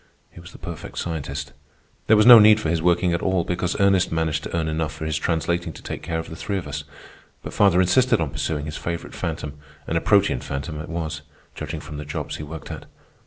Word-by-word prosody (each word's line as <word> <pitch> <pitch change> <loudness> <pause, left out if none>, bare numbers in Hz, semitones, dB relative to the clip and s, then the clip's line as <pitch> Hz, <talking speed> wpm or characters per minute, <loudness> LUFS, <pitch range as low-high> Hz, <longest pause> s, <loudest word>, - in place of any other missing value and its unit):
He - - -13
was 85 +1 -12
the - - -13
perfect 85 -2 -8
scientist. 70 -4 -4 0.5
There 110 - +6
was 105 - +5
no 120 -2 +11
need 105 0 +7
for 80 - -2
his 80 0 0
working 90 +1 +2
at 85 - -1
all, 95 -2 +1
because 90 0 -2
Ernest 100 -2 +3
managed 80 -2 0
to - - -4
earn 80 -1 0
enough 80 0 -2
from 80 0 -6
his 80 -1 -1
translating 85 +1 -1
to - - -13
take - - -5
care 80 - -3
of 80 - -4
the 80 - -8
three 100 +4 -3
of 85 -5 -5
us. 70 0 -5 0.6
But - - -7
father 100 -3 +4
insisted 125 +7 +4
on 80 -5 -1
pursuing 75 +1 -2
his 75 - -5
favorite 85 -1 -5
phantom, 75 -4 -5 0.3
and 80 - 0
a - - -13
protean 100 - +3
phantom 70 +4 -5
it 85 - -9
was, 80 -2 -4 0.3
judging 75 0 -5
from 75 -3 -8
the 75 - -6
jobs 75 - -4
he - - -6
worked 80 0 -8
at. - - -8
80 Hz, 235 wpm, -23 LUFS, 75-90 Hz, 0.6 s, no